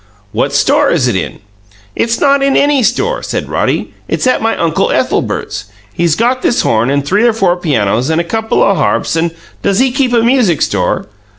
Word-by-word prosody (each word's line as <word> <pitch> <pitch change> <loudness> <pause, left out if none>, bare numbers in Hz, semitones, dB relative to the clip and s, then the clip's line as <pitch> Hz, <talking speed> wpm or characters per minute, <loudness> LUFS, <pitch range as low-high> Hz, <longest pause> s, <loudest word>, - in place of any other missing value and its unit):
"What 120 +6 -1
store 285 - +2
is 145 -7 +1
it 120 - 0
in?" 95 - -4 0.5
"It's 235 0 0
not 280 -1 +3
in 275 0 +2
any 285 -2 +3
store," 395 - 0
said - - -4
Roddy. - - -2
"It's - - -1
at 255 - +2
my 225 0 0
Uncle 165 -2 0
Ethelbert's. - - -2 0.3
He's 170 -2 +1
got 245 +5 0
this 240 - +1
horn 115 +2 +1
and 140 0 0
three 205 +9 +2
or 235 - +2
four 190 -5 +1
pianos 130 - 0
and 160 +1 +1
a - - 0
couple 220 +5 0
o' 200 - +3
harps 165 -1 0
and 165 +1 +1 0.2
" - - -30
"Does 195 - 0
he 260 +2 +2
keep 260 -1 0
a 235 -2 +2
music 235 - +2
store?" 90 -3 -1
200 Hz, 205 wpm, -13 LUFS, -, 0.5 s, not